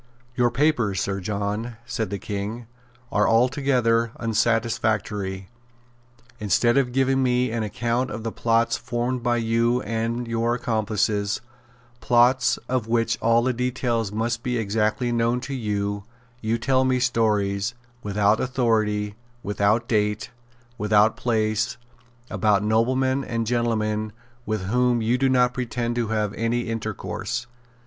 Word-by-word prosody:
"Your 120 Hz, 0 st, +3 dB
papers, 120 Hz, -7 st, +1 dB
Sir 100 Hz, -1 st, -1 dB
John," 105 Hz, +4 st, -3 dB
said 110 Hz, -4 st, -3 dB
the 100 Hz, -, -3 dB
King, 105 Hz, +4 st, -5 dB, 0.5 s
"are 105 Hz, 0 st, +2 dB
altogether 120 Hz, -2 st, +2 dB
unsatisfactory. 110 Hz, -4 st, 0 dB, 0.9 s
Instead 115 Hz, +3 st, +2 dB
of 135 Hz, -3 st, +2 dB
giving 135 Hz, +1 st, +2 dB
me 125 Hz, -1 st, +1 dB
an 115 Hz, 0 st, -1 dB
account 120 Hz, +4 st, -1 dB
of 110 Hz, +1 st, -6 dB
the 115 Hz, -, -2 dB
plots 115 Hz, +1 st, +1 dB
formed 125 Hz, +1 st, -2 dB
by 120 Hz, 0 st, +1 dB
you 115 Hz, +2 st, +1 dB
and 115 Hz, +2 st, -2 dB
your 115 Hz, +1 st, 0 dB
accomplices, 110 Hz, -3 st, 0 dB, 0.6 s
plots 120 Hz, +1 st, +3 dB
of 125 Hz, -3 st, -1 dB
which 115 Hz, 0 st, +1 dB
all 115 Hz, +1 st, +3 dB
the 130 Hz, 0 st, +1 dB
details 120 Hz, -3 st, -1 dB
must 115 Hz, +2 st, -1 dB
be 125 Hz, 0 st, -1 dB
exactly 110 Hz, +3 st, 0 dB
known 120 Hz, +1 st, +1 dB
to 140 Hz, -, -5 dB
you, 100 Hz, -4 st, -2 dB, 0.4 s
you 115 Hz, +1 st, 0 dB
tell 130 Hz, +2 st, +2 dB
me 130 Hz, -1 st, +2 dB
stories, 105 Hz, -3 st, +1 dB, 0.3 s
without 105 Hz, +1 st, +2 dB
authority, 110 Hz, -5 st, 0 dB, 0.3 s
without 105 Hz, +3 st, +1 dB
date, 105 Hz, +2 st, 0 dB, 0.5 s
without 105 Hz, +1 st, +4 dB
place, 115 Hz, 0 st, 0 dB, 0.5 s
about 105 Hz, -2 st, +2 dB
noblemen 130 Hz, +5 st, +1 dB
and 115 Hz, -2 st, -2 dB
gentlemen 110 Hz, -2 st, 0 dB, 0.3 s
with 110 Hz, -2 st, -1 dB
whom 125 Hz, +4 st, +2 dB
you 120 Hz, +3 st, +1 dB
do 135 Hz, 0 st, +3 dB
not 125 Hz, -1 st, +3 dB
pretend 120 Hz, -1 st, -2 dB
to 120 Hz, -2 st, 0 dB
have 105 Hz, -2 st, 0 dB
had -, -, -11 dB
any 115 Hz, +1 st, +1 dB
intercourse. 115 Hz, 0 st, -4 dB
115 Hz, 135 wpm, -24 LUFS, 105-120 Hz, 0.9 s, without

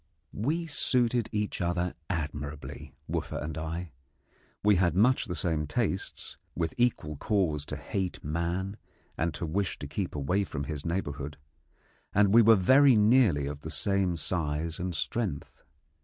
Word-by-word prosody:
We 155 Hz, +10 st, -1 dB
suited 125 Hz, -6 st, +2 dB
each 105 Hz, -2 st, -2 dB
other 90 Hz, 0 st, 0 dB, 0.2 s
admirably, 75 Hz, -3 st, -5 dB
Wooffa -, -, -3 dB
and 75 Hz, 0 st, -4 dB
I. 80 Hz, +2 st, -4 dB, 0.7 s
We 105 Hz, -2 st, +5 dB
had 85 Hz, -2 st, +2 dB
much 125 Hz, +8 st, +4 dB
the 90 Hz, -6 st, -4 dB
same 80 Hz, -4 st, -1 dB
tastes, 95 Hz, +2 st, -3 dB, 0.2 s
with 80 Hz, -2 st, -1 dB
equal 95 Hz, -12 st, 0 dB
cause 80 Hz, -7 st, 0 dB
to -, -, -4 dB
hate 95 Hz, -2 st, -3 dB
man 85 Hz, +6 st, -2 dB, 0.4 s
and 85 Hz, +2 st, 0 dB
to -, -, -3 dB
wish 95 Hz, +5 st, -1 dB
to -, -, -7 dB
keep 90 Hz, +5 st, -3 dB
away 85 Hz, +8 st, +1 dB
from 75 Hz, -6 st, -4 dB
his 70 Hz, 0 st, -5 dB
neighbourhood, 75 Hz, -5 st, -3 dB, 0.8 s
and 100 Hz, 0 st, +5 dB
we 115 Hz, -, +9 dB
were 115 Hz, 0 st, +7 dB
very 130 Hz, +7 st, +6 dB
nearly 105 Hz, -, +4 dB
of 70 Hz, +1 st, -5 dB
the 80 Hz, -, -6 dB
same 95 Hz, +1 st, 0 dB
size 80 Hz, -1 st, -2 dB
and 90 Hz, -1 st, -3 dB
strength. 85 Hz, -, -3 dB
90 Hz, 150 wpm, -29 LUFS, 75-105 Hz, 0.8 s, we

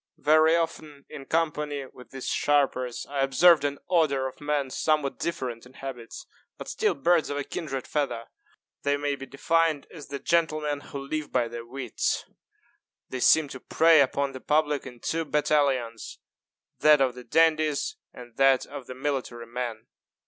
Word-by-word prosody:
Very 155 Hz, +2 st, +4 dB
often, 155 Hz, -4 st, -3 dB
in 135 Hz, -, -9 dB
company 150 Hz, -3 st, -1 dB
with 125 Hz, -2 st, -15 dB
these 135 Hz, -1 st, -7 dB
sharpers, 135 Hz, -4 st, +1 dB
I 140 Hz, -1 st, -4 dB
observed 155 Hz, +5 st, +5 dB
an 145 Hz, 0 st, -1 dB
order 145 Hz, -6 st, +2 dB
of 130 Hz, -, -7 dB
men 145 Hz, -2 st, -1 dB
somewhat 150 Hz, -2 st, 0 dB
different 125 Hz, -8 st, -3 dB
in 125 Hz, -, -16 dB
habits, 130 Hz, -4 st, -8 dB, 0.3 s
but -, -, -8 dB
still 435 Hz, -1 st, 0 dB
birds 170 Hz, -2 st, +2 dB
of 145 Hz, -, -3 dB
a 145 Hz, -, -1 dB
kindred 135 Hz, -3 st, -5 dB
feather. 135 Hz, -6 st, -2 dB, 0.6 s
They 145 Hz, 0 st, +1 dB
may 145 Hz, 0 st, -1 dB
be 135 Hz, -1 st, -9 dB
defined 160 Hz, +1 st, +1 dB
as 150 Hz, -5 st, -10 dB
the 140 Hz, -, -5 dB
gentlemen 155 Hz, -2 st, 0 dB
who 145 Hz, -, -9 dB
live 155 Hz, 0 st, -3 dB
by 120 Hz, -2 st, +1 dB
their 115 Hz, 0 st, -8 dB
wits. 125 Hz, -2 st, -2 dB, 0.8 s
They 130 Hz, -, -4 dB
seem 155 Hz, +4 st, +5 dB
to 130 Hz, -, -8 dB
prey 160 Hz, +3 st, +5 dB
upon 140 Hz, +1 st, 0 dB
the 130 Hz, -1 st, -9 dB
public 150 Hz, -2 st, +1 dB
in 125 Hz, -2 st, -12 dB
two 165 Hz, 0 st, -1 dB
battalions 140 Hz, -7 st, 0 dB, 0.6 s
that 150 Hz, -1 st, +6 dB
of 130 Hz, -2 st, +2 dB
the 125 Hz, 0 st, -10 dB
dandies 155 Hz, -, +2 dB
and 120 Hz, -2 st, -13 dB
that 135 Hz, -1 st, +4 dB
of 130 Hz, -, -9 dB
the 130 Hz, -, -7 dB
military 130 Hz, -4 st, -3 dB
men. 120 Hz, -1 st, -5 dB
140 Hz, 165 wpm, -26 LUFS, 130-155 Hz, 0.8 s, that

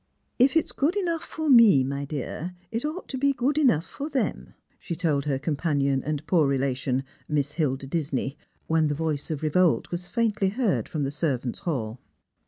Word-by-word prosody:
If 265 Hz, +5 st, +5 dB
it 320 Hz, -, +3 dB
is -, -, -6 dB
good 305 Hz, +7 st, 0 dB
enough 340 Hz, -5 st, -1 dB
for 315 Hz, -2 st, -4 dB
me, 230 Hz, -, +7 dB
my 140 Hz, +2 st, -3 dB
dear, 155 Hz, +5 st, -5 dB, 0.2 s
it 230 Hz, +1 st, -2 dB
ought 310 Hz, +5 st, -4 dB
to 265 Hz, -, -3 dB
be 280 Hz, +1 st, +3 dB
good 270 Hz, +4 st, +1 dB
enough 235 Hz, -, +3 dB
for 290 Hz, +2 st, -6 dB
them," 275 Hz, -4 st, -2 dB, 0.2 s
she 170 Hz, -, -4 dB
told 150 Hz, -5 st, 0 dB
her 140 Hz, -2 st, 0 dB
companion 140 Hz, -2 st, 0 dB
and 155 Hz, 0 st, -3 dB
poor 160 Hz, -4 st, +3 dB
relation. 135 Hz, -1 st, 0 dB, 0.2 s
Miss 145 Hz, -2 st, 0 dB
Hilda 140 Hz, -4 st, -1 dB
Disney, 140 Hz, -2 st, -2 dB, 0.3 s
when 160 Hz, -1 st, +2 dB
the 145 Hz, -, -1 dB
voice 155 Hz, -1 st, -2 dB
of 155 Hz, -2 st, -3 dB
revolt 165 Hz, +2 st, +2 dB
\was 175 Hz, 0 st, -4 dB
faintly 215 Hz, -4 st, +1 dB
heard 220 Hz, -1 st, 0 dB
from 155 Hz, -3 st, -2 dB
the 135 Hz, -, -1 dB
servants' 135 Hz, -4 st, -1 dB
hall. 130 Hz, -, -3 dB
160 Hz, 190 wpm, -26 LUFS, 140-230 Hz, 0.3 s, me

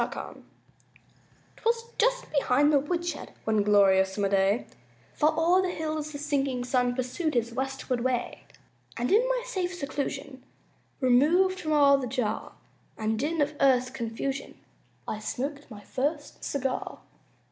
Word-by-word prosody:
BURDETTE -, -, -5 dB, 1.1 s
'Twas 460 Hz, 0 st, 0 dB, 0.2 s
just -, -, +1 dB
behind 285 Hz, +1 st, +3 dB
the 285 Hz, -, +6 dB
woodshed, 340 Hz, +2 st, -3 dB
One 220 Hz, -1 st, +2 dB
glorious 195 Hz, -2 st, +4 dB
summer 200 Hz, -1 st, 0 dB
day, 195 Hz, +3 st, +2 dB, 0.5 s
Far 305 Hz, +1 st, +3 dB
o'er 350 Hz, +3 st, +4 dB
the 375 Hz, -, -1 dB
hills 310 Hz, -3 st, -3 dB
the 290 Hz, -, -6 dB
sinking 280 Hz, -4 st, -1 dB
sun 250 Hz, -1 st, +1 dB
Pursued 260 Hz, +5 st, -2 dB
his 235 Hz, 0 st, 0 dB
westward 265 Hz, -1 st, -2 dB
way; 250 Hz, 0 st, -2 dB, 0.6 s
And 240 Hz, +2 st, -1 dB
in 425 Hz, +4 st, +6 dB
my -, -, 0 dB
safe 370 Hz, -7 st, -2 dB
seclusion 280 Hz, -3 st, -4 dB, 0.6 s
Removed 325 Hz, +10 st, +4 dB
from 310 Hz, -3 st, -1 dB
all 280 Hz, -2 st, +6 dB
the 255 Hz, -, -3 dB
jar 235 Hz, -4 st, -2 dB, 0.4 s
And 220 Hz, 0 st, -1 dB
din 310 Hz, +4 st, 0 dB
of 290 Hz, +1 st, +1 dB
earth's 255 Hz, -2 st, +3 dB
confusion 265 Hz, +2 st, -4 dB, 0.5 s
I 215 Hz, -, -3 dB
smoked 280 Hz, +6 st, -4 dB
my 210 Hz, -3 st, -10 dB
first 290 Hz, +6 st, -3 dB
cigar. 265 Hz, -2 st, -2 dB
275 Hz, 140 wpm, -27 LUFS, 245-310 Hz, 1.1 s, the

